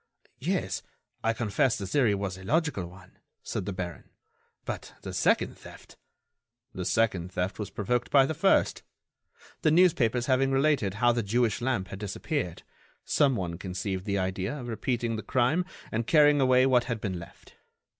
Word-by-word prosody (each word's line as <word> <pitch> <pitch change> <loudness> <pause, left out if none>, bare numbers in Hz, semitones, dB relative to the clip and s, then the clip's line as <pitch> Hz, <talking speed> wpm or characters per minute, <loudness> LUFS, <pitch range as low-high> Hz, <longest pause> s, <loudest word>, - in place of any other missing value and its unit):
"Yes, - - -1 0.4
I 115 - +3
confess 115 +1 +1
the 100 - -4
theory 115 0 +2
was 100 -2 -3
a 95 - -11
logical 145 - 0
one," 90 +1 -16 0.2
said 95 - -4
the - - -1
baron. 90 -4 -6 0.6
"But - - -6
the - - -6
second - - +1
theft—" - - -14 0.8
"The - - -4
second 95 -6 +1
theft 90 +2 -2
was 105 -2 -4
provoked 120 +5 -1
by 135 -2 +6
the 160 - -2
first. - - +2 0.8
The - - +3
newspapers 140 -9 +3
having 135 +1 +2
related 135 -7 +2
how 120 +3 +4
the 120 0 0
Jewish 115 +2 0
lamp 120 -7 -1
had 95 - -7
disappeared, 105 - -3 0.4
some 140 -3 +3
one 85 -4 -4
conceived 95 0 -4
the 100 -2 0
idea 95 +7 -2
of 120 -2 -6
repeating 120 -1 -1
the - - -4
crime 140 +10 +1 0.3
and 110 +1 -2
carrying 150 -2 +5
away 130 -1 +5
what 125 -2 +3
had 115 -2 -3
been 95 -4 -3
left. 85 - -14
115 Hz, 165 wpm, -28 LUFS, 95-130 Hz, 0.8 s, by